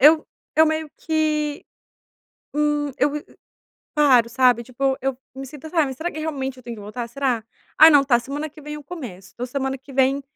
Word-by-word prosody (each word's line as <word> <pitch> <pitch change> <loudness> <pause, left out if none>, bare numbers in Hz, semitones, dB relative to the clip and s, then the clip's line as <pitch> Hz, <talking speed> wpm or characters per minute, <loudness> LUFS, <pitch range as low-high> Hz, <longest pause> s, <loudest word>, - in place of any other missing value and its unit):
eu 310 +3 +6 0.3
eu 315 +1 +6
meio 315 -1 -1
que, 305 -2 0 0.9
hum, 295 -1 +1
eu 285 +3 +3
viv 295 +1 -5 0.7
paro, 255 -6 +5
sabe? 245 -1 +3
Tipo 265 +2 -1
eu 270 0 -1 0.2
me 270 0 -7
sinto, 295 +3 -10
sabe, 305 -6 +2
será 320 +7 -3
que 310 - -8
realmente 270 -4 -3
eu 255 - -13
tenho 235 -1 -7
que - - -10
voltar, 230 +4 -5
será? 250 -3 -1 0.3
"Ah 320 +1 +10
não 285 -2 +6
tá, 245 -3 +4
semana 285 +5 -4
que 305 - -14
vem 300 0 -7
eu 300 -1 -9
começo. 230 - -8
Então 245 +1 -4
semana 265 +1 -2
que 275 +1 -14
vem, 270 +1 +2
275 Hz, 195 wpm, -23 LUFS, 255-300 Hz, 0.9 s, Ah